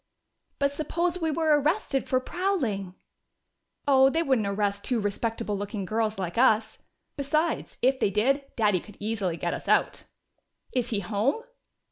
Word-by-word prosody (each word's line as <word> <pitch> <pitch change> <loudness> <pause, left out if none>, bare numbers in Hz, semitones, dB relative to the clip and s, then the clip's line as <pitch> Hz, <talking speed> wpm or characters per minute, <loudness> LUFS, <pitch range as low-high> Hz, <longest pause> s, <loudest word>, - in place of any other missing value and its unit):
"But 280 0 +1
suppose 340 +4 -1
we 325 - +1
were 310 -1 +3
arrested 300 -3 0
for 255 - +3
prowling?" 255 - -2 0.9
"Oh, 265 -1 +6
they 325 +4 +1
wouldn't 260 -9 +1
arrest 200 0 -1
two 245 -3 0
respectable 215 +1 -2
looking 200 0 -4
girls 220 +2 -1
like 185 +2 -3
us! 220 -3 +3 0.4
Besides, 305 +4 -1
if 260 +1 +3
they - - +2
did, 255 +8 +2
Daddy 210 -5 +2
could 210 - -14
easily 205 -5 -2
get - - -2
us - - -6
out." - - +2 0.7
"Is 245 -2 0
he 210 -3 0
home?" 220 - 0
235 Hz, 150 wpm, -27 LUFS, 205-285 Hz, 0.9 s, Oh